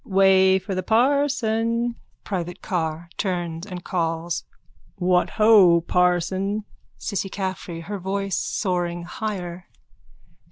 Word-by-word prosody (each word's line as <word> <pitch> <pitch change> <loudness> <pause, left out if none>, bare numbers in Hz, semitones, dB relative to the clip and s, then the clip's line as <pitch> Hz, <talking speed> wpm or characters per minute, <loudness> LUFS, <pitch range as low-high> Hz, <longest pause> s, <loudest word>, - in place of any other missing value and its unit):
_ - - -13
Way 190 0 +5
for 190 +1 -5
the 185 - -1
parson. 235 -1 +1 0.3
PRIVATE 175 -3 -4
CARR: 165 -3 -2
(Turns 175 -2 -2
and 180 -3 -7
calls.) 165 -1 -2 0.5
What 180 -2 +2
ho, 205 -6 +7
parson! 180 +4 +1 0.3
CISSY 200 -2 -3
CAFFREY: 185 -3 -4
_(Her 200 +2 -5
voice 195 +1 -2
soaring 175 -3 -1
higher.) 180 -2 -5
190 Hz, 110 wpm, -23 LUFS, 175-205 Hz, 0.5 s, ho